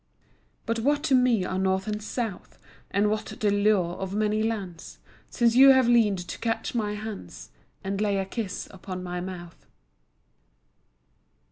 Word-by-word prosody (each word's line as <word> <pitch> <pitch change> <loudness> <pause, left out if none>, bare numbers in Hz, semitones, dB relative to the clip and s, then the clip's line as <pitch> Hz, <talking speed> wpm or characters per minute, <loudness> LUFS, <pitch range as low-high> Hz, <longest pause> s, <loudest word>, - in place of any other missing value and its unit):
But 230 0 -1
what 290 +5 +1
to 285 - +1
me 250 -6 +3
are 185 +1 -2
north 190 0 +1
and 210 0 -3
south, 220 -2 -5 0.3
And 200 +2 +2
what 215 0 -2
the 215 -1 -1
lure 200 -4 +2
of 190 +1 -4
many 215 0 +1
lands, 205 -6 -4 0.3
Since 235 -2 +2
you 270 +2 +9
have 260 -2 +4
leaned 210 -7 +3
to - - -6
catch 225 -1 -2
my 210 -3 -1
hands 205 - -8 0.3
And 195 +1 -2
lay 205 -2 +1
a 195 - -1
kiss 200 -1 -5
upon 185 -1 -7
my 180 0 -4
mouth. 175 -2 -9
210 Hz, 155 wpm, -26 LUFS, 190-225 Hz, 0.3 s, you